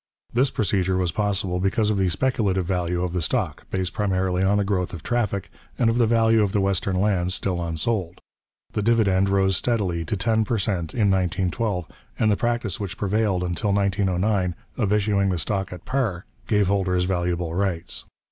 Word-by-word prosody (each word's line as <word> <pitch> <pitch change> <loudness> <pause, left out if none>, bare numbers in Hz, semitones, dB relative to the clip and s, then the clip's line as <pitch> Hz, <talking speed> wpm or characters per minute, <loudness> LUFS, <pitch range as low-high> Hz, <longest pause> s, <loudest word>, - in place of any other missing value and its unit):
This 130 +3 +3
procedure 95 -4 0
was 90 -2 +1
possible 95 -2 -1
because 105 +3 +1
of 100 - 0
the 95 -1 +2
speculative 100 -3 +1
value 90 -1 -1
of 90 -1 -2
the 90 - -1
stock, - - -2
based 95 -2 -2
primarily 95 -3 0
on 100 +2 +3
the 105 - +2
growth 95 -2 -1
of 80 - -10
traffic, 110 -5 -1 0.3
and 115 -1 +3
of 120 - 0
the 115 - +4
value 115 -1 +4
of 100 -2 0
the 105 - +2
western 95 -1 0
lands 95 -2 +1
still 90 -3 -1
unsold: 85 +2 -2 0.5
the 105 - 0
dividend 100 -4 +3
rose 95 -1 +3
steadily 95 -9 0
to 105 - -2
ten 110 +3 +2
per 115 +1 -1
cent 95 -5 -2
in 105 -4 +3
1912, 95 +1 0 0.3
and 110 - +3
the - - +3
practice 120 -5 -1
which 100 -3 -5
prevailed 100 -2 0
until 90 +3 0
1909 100 -1 +1 0.2
of 105 -6 0
issuing 100 -2 +2
the 90 - 0
stock 95 +4 -2
at 90 -2 -9
par 120 -9 -1 0.2
gave 105 -2 +3
holders 95 -2 +1
valuable 90 -2 -1
rights. 90 -2 -2
95 Hz, 185 wpm, -24 LUFS, 90-105 Hz, 0.5 s, the